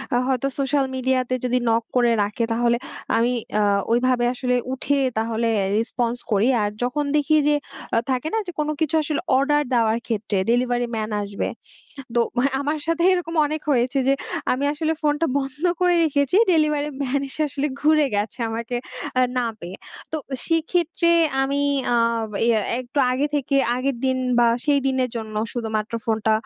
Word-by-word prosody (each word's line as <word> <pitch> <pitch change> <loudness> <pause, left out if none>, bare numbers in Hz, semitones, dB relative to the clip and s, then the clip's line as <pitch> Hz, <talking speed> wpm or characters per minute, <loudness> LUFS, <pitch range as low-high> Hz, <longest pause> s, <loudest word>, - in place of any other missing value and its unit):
আ - - +4
হয়তো 265 0 0
সোশ্যাল 275 0 +1
মিডিয়াতে 255 -1 0
যদি 250 0 +1
নক 230 0 +2
করে 240 -1 +4
রাখে 210 +3 -2
তাহলে 235 +1 +2 0.4
আমি 235 +2 +2 0.3
আ - - +3 0.3
ওইভাবে 245 +1 +2
আসলে 250 0 -1 0.2
উঠে 275 +2 -1 0.2
তাহলে 225 +1 -1 0.2
আ - - 0
response 240 +1 -1
করি। 210 +2 +3
আর 205 - +1
যখন 285 +4 -1
দেখি 300 +1 +2
যে 295 - +4 0.4
আ - - +4
থাকে 255 +3 -1
না - - +2
যে - - -4
কোন 300 - 0
কিছু 315 0 +1
আসলে 300 +1 -2 0.2
অর্ডার 295 +2 +2
দেওয়ার 225 -2 +3
ক্ষেত্রে 215 -3 -1
ডেলিভারি 245 0 +1
ম্যান 215 -1 -2
আসবে। 200 0 -3 0.7
তো 240 - +3 0.4
আমার 295 +2 -1
সাথে 330 +1 0
এরকম 350 -2 -2
অনেক 305 +1 -4
হয়েছে 255 0 +1
যে - - +5 0.4
আমি 265 +3 -1
আসলে 315 +1 -1
ফোনটা 300 +2 +1
বন্ধ 275 +2 -6 0.2
করে 360 -1 +4
রেখেছি 285 +1 +1 0.2
ডেলিভারি 300 -2 +2
ম্যান 275 +1 0
এসে 295 +3 -2
আসলে 280 +1 -2
ঘুরে 305 0 +4
গেছে 205 +4 -2
আমাকে 230 +2 -3 0.4
আ - - +5 0.2
না 245 -1 +1
পেয়ে। 175 +3 -7 0.4
তো - - 0 0.3
সেক্ষেত্রে 335 +1 +1 0.3
আমি 280 +1 0 0.3
আ - - +3 0.5
ইয়ে 230 -2 +4 0.2
একটু 255 +3 -5
আগে 270 +3 +1
থেকে 275 -1 0 0.2
আগের 265 +1 -1
দিন 260 0 +1 0.2
বা 240 - +5 0.2
সেই 290 -1 +4
দিনের 260 -1 +1
জন্য 220 -1 -6 0.2
শুধুমাত্র 220 -2 -3
ফোনটা 220 -1 +1
255 Hz, 170 wpm, -22 LUFS, 235-295 Hz, 0.7 s, যে